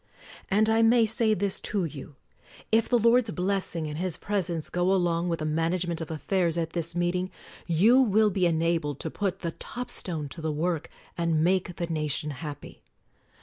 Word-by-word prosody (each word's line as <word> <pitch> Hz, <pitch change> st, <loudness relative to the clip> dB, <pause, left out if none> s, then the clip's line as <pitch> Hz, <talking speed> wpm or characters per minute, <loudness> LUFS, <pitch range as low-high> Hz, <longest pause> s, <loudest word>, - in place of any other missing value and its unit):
And 210 Hz, +2 st, +3 dB
I 225 Hz, +1 st, +3 dB
may 230 Hz, 0 st, +5 dB
say 220 Hz, 0 st, +2 dB
this 200 Hz, 0 st, 0 dB
to 200 Hz, -4 st, -1 dB
you: 145 Hz, -2 st, -8 dB, 0.6 s
If 225 Hz, 0 st, +3 dB
the 245 Hz, -, +4 dB
Lord's 235 Hz, 0 st, +4 dB
blessing 185 Hz, -4 st, -1 dB
and 150 Hz, 0 st, -5 dB
His 180 Hz, -2 st, -1 dB
presence 180 Hz, -6 st, -2 dB
go 180 Hz, +1 st, 0 dB
along 175 Hz, -2 st, +1 dB
with 165 Hz, -, 0 dB
the 155 Hz, -, -4 dB
management 165 Hz, +2 st, -1 dB
of 160 Hz, -, -5 dB
af 155 Hz, -4 st, -6 dB
fairs 175 Hz, -4 st, +1 dB
at 165 Hz, -1 st, -1 dB
this 170 Hz, 0 st, -1 dB
meeting, 175 Hz, +1 st, 0 dB, 0.4 s
you 210 Hz, +10 st, +5 dB
will 215 Hz, -3 st, +3 dB
be 185 Hz, -2 st, +2 dB
enabled 165 Hz, -3 st, 0 dB
to -, -, -3 dB
put 200 Hz, -3 st, -2 dB
the 170 Hz, -, -2 dB
top 245 Hz, +8 st, -6 dB
stone 160 Hz, -9 st, -4 dB
to 165 Hz, -, -8 dB
the 160 Hz, 0 st, -1 dB
work 160 Hz, +1 st, -2 dB, 0.3 s
and 165 Hz, -2 st, +1 dB
make 180 Hz, 0 st, +1 dB
the 170 Hz, -, -2 dB
nation 150 Hz, -2 st, -2 dB
happy. 145 Hz, 0 st, -8 dB
175 Hz, 190 wpm, -27 LUFS, 160-200 Hz, 0.6 s, may